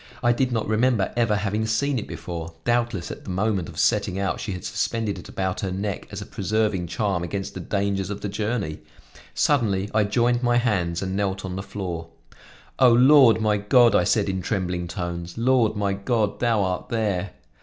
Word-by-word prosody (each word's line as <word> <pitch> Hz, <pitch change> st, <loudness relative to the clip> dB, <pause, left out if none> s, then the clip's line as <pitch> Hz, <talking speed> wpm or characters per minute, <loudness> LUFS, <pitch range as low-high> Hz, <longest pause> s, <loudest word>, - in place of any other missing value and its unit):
I 120 Hz, -, +4 dB
did 130 Hz, +1 st, 0 dB
not 115 Hz, -3 st, -1 dB
remember 110 Hz, -1 st, +1 dB
ever 115 Hz, -3 st, +2 dB
having 105 Hz, +1 st, -1 dB
seen 130 Hz, +4 st, +1 dB
it -, -, -7 dB
before; 85 Hz, -1 st, -6 dB
doubtless, 120 Hz, -6 st, 0 dB
at -, -, -9 dB
the -, -, -9 dB
moment 95 Hz, -1 st, -1 dB
of 80 Hz, -, -12 dB
setting 100 Hz, +2 st, +1 dB
out 95 Hz, -1 st, -1 dB
she 100 Hz, -, -4 dB
had 90 Hz, -, -7 dB
suspended 110 Hz, -3 st, -2 dB
it -, -, -11 dB
about 95 Hz, -1 st, -2 dB
her 95 Hz, -, -2 dB
neck 100 Hz, +1 st, -4 dB
as -, -, -6 dB
a -, -, -11 dB
preserving 105 Hz, -4 st, -1 dB
charm 95 Hz, +1 st, -1 dB
against 95 Hz, +3 st, -4 dB
the -, -, -6 dB
dangers 100 Hz, 0 st, -1 dB
of 105 Hz, -1 st, -5 dB
the -, -, -3 dB
journey. 105 Hz, -5 st, -2 dB, 0.6 s
Suddenly 105 Hz, -8 st, +1 dB
I 105 Hz, -1 st, +3 dB
joined 120 Hz, +3 st, +1 dB
my, 120 Hz, -1 st, +2 dB
hands 95 Hz, -8 st, 0 dB
and 95 Hz, 0 st, -3 dB
knelt 95 Hz, -1 st, -1 dB
on 90 Hz, -1 st, -5 dB
the 95 Hz, -, -3 dB
floor. 90 Hz, -5 st, -5 dB, 0.7 s
"O, 130 Hz, -2 st, +7 dB
Lord 125 Hz, -1 st, +6 dB
my 105 Hz, -1 st, +2 dB
God," 115 Hz, +4 st, +4 dB
I -, -, +4 dB
said 105 Hz, -3 st, +2 dB
in 95 Hz, -1 st, -2 dB
trembling 90 Hz, -2 st, -2 dB
tones, 85 Hz, 0 st, -5 dB
"Lord, 115 Hz, -2 st, +2 dB
my 100 Hz, -1 st, 0 dB
God, 105 Hz, +1 st, -1 dB
thou 115 Hz, -4 st, +2 dB
art 95 Hz, -1 st, -3 dB
there!" 100 Hz, -5 st, -1 dB
105 Hz, 195 wpm, -24 LUFS, 95-115 Hz, 0.7 s, O